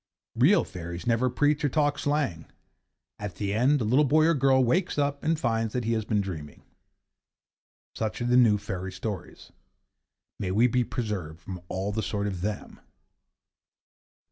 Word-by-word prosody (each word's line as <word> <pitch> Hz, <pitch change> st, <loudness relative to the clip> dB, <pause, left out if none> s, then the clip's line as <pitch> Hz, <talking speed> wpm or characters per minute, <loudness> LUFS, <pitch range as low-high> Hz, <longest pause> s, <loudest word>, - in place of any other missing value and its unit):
Real 140 Hz, -, +4 dB
fairies 85 Hz, -1 st, -7 dB
never 120 Hz, +2 st, +2 dB
preach 145 Hz, +4 st, +1 dB
or 145 Hz, -, +2 dB
talk 145 Hz, +1 st, +1 dB
slang. 145 Hz, -, -1 dB, 0.7 s
At 100 Hz, -3 st, -5 dB
the 100 Hz, -1 st, -2 dB
end, 130 Hz, +7 st, +3 dB
the 120 Hz, -, -2 dB
little 130 Hz, +7 st, +4 dB
boy 155 Hz, +2 st, +4 dB
or 165 Hz, -, +4 dB
girl 135 Hz, -2 st, +3 dB
wakes 170 Hz, +10 st, +1 dB
up 140 Hz, -1 st, 0 dB
and 160 Hz, 0 st, +1 dB
finds 115 Hz, -4 st, 0 dB
that 125 Hz, -, -1 dB
he 115 Hz, +1 st, 0 dB
has 110 Hz, -2 st, -1 dB
been 105 Hz, -2 st, +1 dB
dreaming. 80 Hz, -7 st, -7 dB, 1.3 s
Such 110 Hz, -3 st, -3 dB
are 120 Hz, -, -2 dB
the 120 Hz, 0 st, +2 dB
new 115 Hz, -4 st, +5 dB
fairy 95 Hz, -2 st, -5 dB
stories. 95 Hz, -1 st, -7 dB, 0.9 s
May 95 Hz, -, -2 dB
we 105 Hz, +6 st, +3 dB
be 125 Hz, 0 st, +2 dB
preserved 100 Hz, -10 st, -4 dB
from 90 Hz, +1 st, -7 dB
all 95 Hz, +2 st, -2 dB
the 110 Hz, +2 st, -2 dB
sort 105 Hz, -1 st, -2 dB
of 95 Hz, -4 st, -3 dB
them! 105 Hz, +2 st, -4 dB
115 Hz, 170 wpm, -27 LUFS, 100-135 Hz, 1.3 s, new